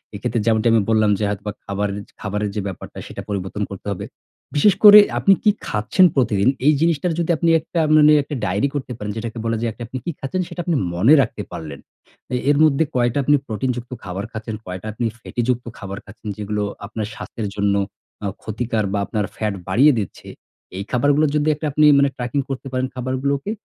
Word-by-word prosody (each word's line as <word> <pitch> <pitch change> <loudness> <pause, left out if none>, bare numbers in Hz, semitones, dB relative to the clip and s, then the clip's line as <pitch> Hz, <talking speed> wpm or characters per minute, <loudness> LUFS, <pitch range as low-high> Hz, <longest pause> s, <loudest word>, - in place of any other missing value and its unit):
এক্ষেত্রে 115 +3 -2
যেমনটি 110 0 +2
আমি 115 - +4
বললাম 110 -2 +3
যে 105 - -1
হয়তোবা 105 +1 -4
খাবার 100 +1 -2 0.3
খাবারের 105 0 -2
যে 105 - -1
ব্যাপারটা 95 - -8
সেটা - - -7
পরিবর্তন 100 +1 -3
করতে 100 +1 -8
হবে। 90 - -6 0.5
বিশেষ 180 +7 +5
করে 210 0 +12 0.2
আপনি 195 - +5
কি 215 - +5 0.2
খাচ্ছেন 105 - +3
প্রতিদিন, 120 -4 +2 0.2
এই 150 - +6
জিনিসটার 165 +1 +1
যদি 170 0 +1
আপনি 170 +1 +1
একটা 165 +2 -4 0.2
মানে 150 0 +7
একটা 145 0 -6
ডায়েরি 100 +8 0
করতে 135 -3 -4
পারেন। 105 0 -4
যেটাকে 115 +1 -5
বলা 115 0 0
যায় 115 - 0 0.2
আপনি 130 - -6
কি 170 - -1
খাচ্ছেন 160 +7 -2
সেটা 175 - -5
আপনি 175 -3 +1 0.2
মনে 100 - +5
রাখতে - - -3
পারলেন। 75 -4 -7 0.6
এ - - +1
এর 145 - +4
মধ্যে 155 0 +4
কয়টা 120 +1 +1
আপনি 145 +2 +4
প্রোটিন 115 +4 -2
যুক্ত 120 0 -8
খাবার 95 +1 -5
খাচ্ছেন, 110 0 -5
কয়টা 90 +3 -6
আপনি 120 +3 -2
ফ্যাটি 120 - -4
যুক্ত 125 -1 0
খাবার 100 0 -7
খাচ্ছেন 105 +2 -10
যেগুলো 105 0 -2 0.2
আপনার 110 0 -4
স্বাস্থ্যের 110 -3 -5
জন্য 100 -1 +1 0.5
অ্যা 100 - -3
ক্ষতিকর। 110 0 -2
বা 100 - +1
আপনার 105 -1 -2
ফ্যাট 105 -2 -1
বাড়িয়ে 130 +11 +5
দিচ্ছে। 100 - -7 0.5
এই 100 - -3
খাবারগুলো 145 +5 +3
যদি 150 +1 +1 0.2
আপনি 150 +2 +4
মানে 140 0 +4
ট্র্যাকিং 125 +3 -2
করতে 135 0 -5
পারেন 130 0 -1
খাবারগুলোকে, 135 +7 -2
115 Hz, 195 wpm, -21 LUFS, 105-140 Hz, 0.6 s, করে